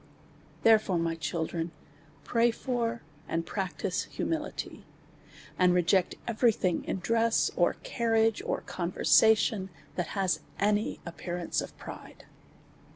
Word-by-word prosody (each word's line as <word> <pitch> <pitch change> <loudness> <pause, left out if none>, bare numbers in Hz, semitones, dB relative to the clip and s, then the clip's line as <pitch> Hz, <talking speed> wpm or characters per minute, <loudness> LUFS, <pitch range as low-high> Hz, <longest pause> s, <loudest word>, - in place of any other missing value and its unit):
Therefore, 215 -5 +5
my 165 0 0
children, 165 0 -3 0.5
pray 235 0 +3
for, 235 -1 -2 0.2
and 165 0 -1
practise 190 -1 -2
hu - - -1
mility, 315 -2 -3 0.8
and 180 -1 +5
reject 180 +1 +2
every 235 +1 +3
thing 180 -4 0
in - - -2
dress, 230 +3 +2
or - - +3
carriage, 225 -2 +1
or - - -2
conversation, 195 +3 +3 0.3
that 175 +2 -3
has 190 -2 +1 0.2
any 210 +1 +1
appearance 175 0 -3
of - - -9
pride. - - -10
195 Hz, 115 wpm, -29 LUFS, 175-225 Hz, 0.8 s, Therefore